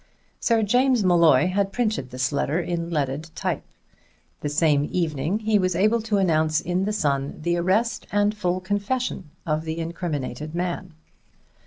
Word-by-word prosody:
Sir 230 -2 +2
James 245 +2 +3
Molloy 170 -6 +5
had 195 +1 0
printed 215 - -1
this 130 +2 -1
letter 145 +3 0
in 170 -1 -3
leaded 150 0 -2
type. - - -2 0.8
The 145 - -3
same 150 -1 +2
evening 160 +1 0
he 215 -1 +2
was 185 -2 +1
able 215 +6 +3
to 215 -2 0
announce 155 -4 +2
in 180 +2 -1
the 210 - 0
Sun 140 -9 -1
the 175 +1 +1
arrest 215 +6 0
and 205 +1 +2
full 185 -3 -1
confession 205 -1 -2 0.2
of 155 0 0
the 160 0 -4
incriminated 155 -3 -4
man. 175 -1 -3
175 Hz, 155 wpm, -24 LUFS, 155-205 Hz, 0.8 s, Molloy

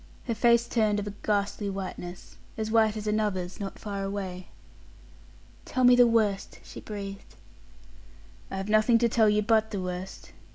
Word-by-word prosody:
Her 235 - -1
face 235 +1 +3
turned 215 -3 +1
of 205 - -4
a 205 - -5
ghastly 205 0 -1
whiteness 185 -2 -7 0.2
as 220 0 -3
white 220 -1 +3
as 210 - -5
another's 205 -4 -1
not 195 -2 -5
far 200 -2 -5
away. 190 -2 -5 1.2
"Tell 255 - -2
me 245 0 +8
the 245 -1 +6
worst," 215 -4 0
she - - -10
breathed. 200 -1 -8 1.1
"I 195 - -5
have 195 +1 -4
nothing 215 +2 +4
to 235 +1 +3
tell 225 -2 +3
you 210 0 +2
but 220 0 +2
the 205 -3 -4
worst. 180 +1 -6
210 Hz, 165 wpm, -27 LUFS, 195-220 Hz, 1.2 s, me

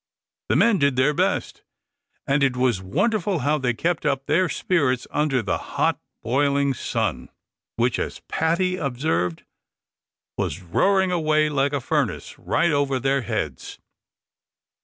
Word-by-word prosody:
The - - +2
men 230 -4 +4
did 140 -2 +2
their 130 +4 +3
best, - - -1 0.6
and 140 +1 +1
it 130 -2 +2
was 125 -6 +1
wonderful 190 - 0
how 150 +1 +2
they 125 -3 0
kept 170 +7 -1
up 140 -2 0
their 165 +5 +2
spirits 140 -10 0
under 140 -5 +1
the 95 - -1 0.2
hot - - +2 0.2
broiling 140 +2 +1
sun, - - -2 0.5
which, 120 -1 +1
as - - -4
Paddy 175 +3 0
observed, 125 - -1 1.0
"was 85 +7 -2
roaring 190 - +2
away 155 -3 +2
like 140 -1 +1
a 145 - +1
furnace, 120 - -2
right 170 -1 +1
over 140 -2 +1
their 135 +1 +1
heads." 105 - -4
140 Hz, 140 wpm, -23 LUFS, 125-160 Hz, 1.0 s, men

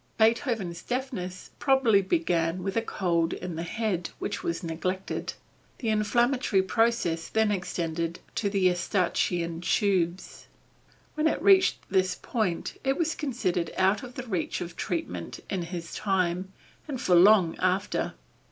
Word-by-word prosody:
Beethoven's 220 -6 +1
deafness 245 -8 -4
probably 265 -7 +4
began 180 - 0
with 195 0 -3
a 230 - +2
"cold 170 -7 0
in 180 -2 -5
the 165 - -3
head" 180 -1 -2
which - - -3
was 170 +2 -3
neglected. 185 +3 -3 0.4
The 230 - -2
inflammatory 220 0 +2
process 190 -5 +1
then 220 -1 +2
extended 170 -3 -2
to 205 - 0
the 195 -1 0
Eustachian 175 -2 +1
tubes. 185 -2 0 0.7
When 310 0 +1
it - - 0
reached 380 -1 +4
this 185 -1 +2
point 210 -8 -2
it 270 0 +1
was 325 -2 +1
considered 185 - -1
out 190 +2 +3
of 250 -1 -10
the 260 - -5
reach 190 -8 -2
of 170 -1 -6
treatment 90 - -4
in 190 - -1
his 170 0 -6
time, 185 -2 0 0.4
and 275 -4 -4
for 180 - +1
long 180 -1 +6
after. 185 +2 0
190 Hz, 140 wpm, -27 LUFS, 175-230 Hz, 0.7 s, long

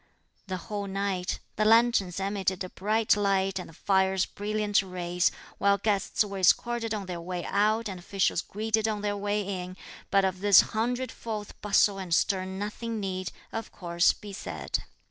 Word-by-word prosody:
The 185 -1 -2
whole 200 +3 -5
night, 195 -2 -2 0.2
the 215 - +2
lanterns 220 -5 +4
emitted 195 -1 -1
a 185 - -6
bright 215 +4 +2
light 195 -2 +1
and 180 - -7
the - - -14
fires 190 +1 +2
brilliant 210 0 0
rays; 180 -1 0 0.3
while 200 0 +4
guests 205 +1 +1
were 200 -1 -5
escorted 230 +5 +2
on 210 -3 -2
their 175 -2 -5
way 175 0 -4
out 215 +3 +2
and 190 -3 -6
officials 185 -1 0
greeted 220 +1 -1
on 210 -2 -2
their 205 0 -1
way 205 +1 -1
in; 185 -2 -5 0.3
but 195 -1 +4
of 185 -1 -1
this 200 -1 +7
hundredfold 225 -2 -3
bustle 200 -1 +3
and 180 -3 0
stir 185 0 +1
nothing 210 +4 -4
need, 185 -2 -3 0.2
of 225 -1 -5
course, 170 -1 +2
be 205 -1 -10
said. - - -3
200 Hz, 165 wpm, -28 LUFS, 185-210 Hz, 0.3 s, this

